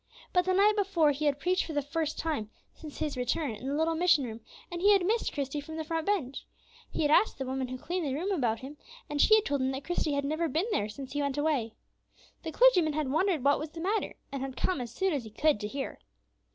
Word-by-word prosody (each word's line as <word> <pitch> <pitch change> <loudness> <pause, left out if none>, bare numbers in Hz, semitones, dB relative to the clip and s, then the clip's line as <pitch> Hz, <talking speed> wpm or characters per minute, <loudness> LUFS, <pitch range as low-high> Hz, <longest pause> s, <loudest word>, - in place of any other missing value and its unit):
But 360 -1 +3
the 370 - +2
night 410 +2 +5
before 375 -7 +3
he 290 +2 -3
had 285 -2 +2
preached 365 +4 +1
for 320 - -6
the 290 - +1
first 310 +1 -2
time 300 -10 -2 0.2
since 305 -2 -10
his 300 -2 -2
return 255 +3 -1
in 220 +4 -7
the 280 - -1
little 320 +2 +1
mission 325 -3 +3
room, 230 -2 -6 0.3
and 345 0 -4
he 410 +2 +6
had 385 -3 +3
missed 450 +4 +1
Christie 285 0 -3
from 315 +2 -8
the 320 - -2
front 325 +1 -3
bench. 310 -11 -1 0.5
He - - -2
had 295 - +2
asked 430 - +4
the 265 - -3
woman 260 0 -2
who 255 +1 -5
cleaned 345 +3 -3
the 265 - -1
room 360 +7 -2
about 240 - 0
him, 280 +3 -9 0.3
and 290 -1 +1
she 435 - +7
had 435 -1 +2
told 285 -1 0
him 260 - +1
that 265 +1 -5
Christie 350 -4 -1
had 280 0 0
never 315 +3 0
been 325 +6 0
there 210 - 0
since 265 +5 -8
he 290 - -1
went 280 -1 -1
away. 290 -7 0 0.7
The 320 - -5
clergyman 360 -9 +5
had 295 -3 -1
wondered 325 -2 +1
what 285 0 +4
was 305 - -5
the 330 - -10
matter, 405 +6 -1 0.2
and 275 -1 -4
had 265 -1 -5
come 360 -8 0
as 240 - -5
soon 380 +7 0
as 280 -4 -1
he 220 - -9
could 295 +3 +2
to 210 - -3
hear. 270 +5 -5
300 Hz, 260 wpm, -29 LUFS, 270-345 Hz, 0.7 s, she